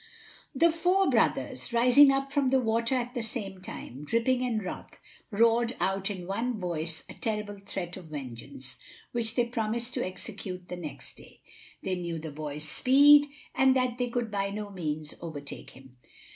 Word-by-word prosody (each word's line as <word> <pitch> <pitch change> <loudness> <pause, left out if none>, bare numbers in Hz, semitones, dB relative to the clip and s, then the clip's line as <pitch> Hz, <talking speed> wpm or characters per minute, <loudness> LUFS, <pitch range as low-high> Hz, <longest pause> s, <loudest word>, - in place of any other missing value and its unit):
The 335 +5 +5
four 360 +4 +2
brothers, - - +1
rising 250 +4 +7
up 275 0 0
from 275 -2 +2
the 265 0 +4
water 230 +1 +1
at 245 -1 -2
the 245 - -2
same 210 -5 -4
time, 140 -6 -8
dripping 235 - +1
and 230 -4 -1
wroth, - - -7 0.3
roared 230 +2 +3
out 195 +2 0
in 185 -3 -5
one 225 +5 -2
voice 165 -3 -2
a - - -9
terrible 210 -3 -3
threat 180 -3 -5
of 180 -3 -10
vengeance, 135 -2 -6 0.3
which 230 -2 -1
they 245 - +3
promised 235 +1 -1
to - - 0
execute 185 -1 -6
the 180 - -4
next 150 - -8
day. - - -16 0.4
They 190 - -1
knew 170 -2 -3
the 160 -1 -6
boy's 150 0 -5
speed, 285 - +6 0.3
and 265 0 +4
that 255 -1 0
they 245 -1 0
could 235 -2 -2
by 200 -1 0
no 205 0 -5
means 155 -5 -3
overtake 145 -4 -7
him. 130 -1 -16
210 Hz, 170 wpm, -29 LUFS, 175-245 Hz, 0.4 s, rising